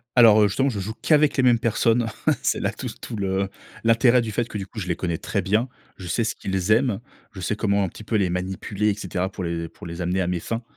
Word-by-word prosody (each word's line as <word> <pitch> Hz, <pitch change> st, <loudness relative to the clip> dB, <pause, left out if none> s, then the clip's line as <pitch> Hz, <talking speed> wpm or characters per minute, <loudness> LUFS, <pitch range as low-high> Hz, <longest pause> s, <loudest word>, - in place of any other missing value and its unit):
Alors, 110 Hz, -3 st, +7 dB
heu, -, -, +6 dB
justement, 135 Hz, +8 st, +1 dB
je 110 Hz, -6 st, -3 dB
joue 100 Hz, +3 st, -3 dB
qu'avec 150 Hz, -2 st, +3 dB
les -, -, +5 dB
mêmes 120 Hz, -2 st, +5 dB
personnes. 115 Hz, +1 st, +2 dB, 0.4 s
C'est -, -, +1 dB
là -, -, 0 dB
tout -, -, -9 dB
s -, -, -6 dB
tout 115 Hz, -, -6 dB
le 95 Hz, -1 st, -1 dB, 0.3 s
l'intérêt 120 Hz, +2 st, +5 dB
du 115 Hz, -2 st, -3 dB
fait 120 Hz, +2 st, -1 dB
que 105 Hz, -, -6 dB
du 95 Hz, -, -5 dB
coup, 110 Hz, -, -12 dB
je 90 Hz, -, -3 dB
les 85 Hz, -, 0 dB
connais 85 Hz, -2 st, -2 dB
très -, -, -2 dB
bien. 110 Hz, +6 st, +1 dB, 0.3 s
Je 90 Hz, -, -9 dB
sais 85 Hz, +7 st, 0 dB
ce 110 Hz, -, -1 dB
qu'ils 95 Hz, +1 st, -2 dB
aiment. 115 Hz, -2 st, +3 dB, 0.3 s
Je 95 Hz, -, -9 dB
sais 105 Hz, +4 st, -1 dB
comment 100 Hz, -2 st, +1 dB
un 95 Hz, -, 0 dB
petit 105 Hz, -, -11 dB
peu 110 Hz, -, 0 dB
les 95 Hz, -3 st, +2 dB
manipuler 95 Hz, +3 st, -1 dB
et -, -, 0 dB
cetera 95 Hz, -2 st, -3 dB
pour 95 Hz, -, -6 dB
les 85 Hz, -1 st, -3 dB
pour -, -, -12 dB
les 85 Hz, +2 st, -5 dB
amener 90 Hz, +2 st, 0 dB
à 90 Hz, -, 0 dB
mes 90 Hz, -1 st, -1 dB
fins. 115 Hz, +5 st, -3 dB
105 Hz, 275 wpm, -24 LUFS, 95-115 Hz, 0.4 s, Alors